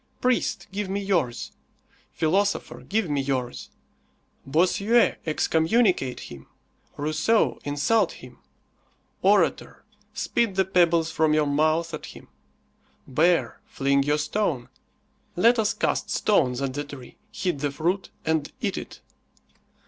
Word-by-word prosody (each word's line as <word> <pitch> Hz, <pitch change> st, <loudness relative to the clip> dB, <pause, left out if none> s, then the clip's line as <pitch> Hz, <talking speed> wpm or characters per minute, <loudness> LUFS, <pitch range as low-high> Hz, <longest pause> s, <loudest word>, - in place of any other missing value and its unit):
Priest, 250 Hz, -1 st, 0 dB
give 200 Hz, 0 st, -3 dB
me 195 Hz, +1 st, -1 dB
yours. 175 Hz, -12 st, -1 dB, 0.6 s
Philosopher, 195 Hz, +6 st, 0 dB
give 215 Hz, -1 st, -1 dB
me 145 Hz, -2 st, 0 dB
yours. 130 Hz, -3 st, -3 dB, 0.8 s
Bossuet, 200 Hz, -, +2 dB
excommunicate 160 Hz, -, +1 dB
him. 70 Hz, -1 st, -11 dB, 0.5 s
Rousseau, 155 Hz, +10 st, +1 dB
insult 145 Hz, +11 st, +1 dB
him. -, -, -14 dB, 0.8 s
Orator, -, -, +1 dB, 0.3 s
spit 230 Hz, -5 st, -1 dB
the 190 Hz, 0 st, +2 dB
pebbles 170 Hz, -3 st, +2 dB
from 155 Hz, -1 st, +2 dB
your 155 Hz, -1 st, +3 dB
mouth 155 Hz, +3 st, +1 dB
at 155 Hz, -, -6 dB
him. -, -, -13 dB, 0.8 s
Bear, 165 Hz, +6 st, +1 dB
fling 140 Hz, 0 st, +1 dB
your 145 Hz, +2 st, +1 dB
stone. 150 Hz, -, -1 dB, 0.7 s
Let 230 Hz, +6 st, +4 dB
us 215 Hz, 0 st, +2 dB
cast -, -, -1 dB
stones 130 Hz, -10 st, +1 dB
at 135 Hz, -1 st, -2 dB
the 145 Hz, +2 st, -3 dB
tree, 140 Hz, -4 st, -11 dB
hit 180 Hz, -8 st, -2 dB
the 145 Hz, +1 st, -1 dB
fruit 175 Hz, +7 st, -2 dB, 0.2 s
and 160 Hz, -2 st, 0 dB
eat -, -, -2 dB
it. -, -, -11 dB
160 Hz, 120 wpm, -25 LUFS, 145-195 Hz, 0.8 s, Let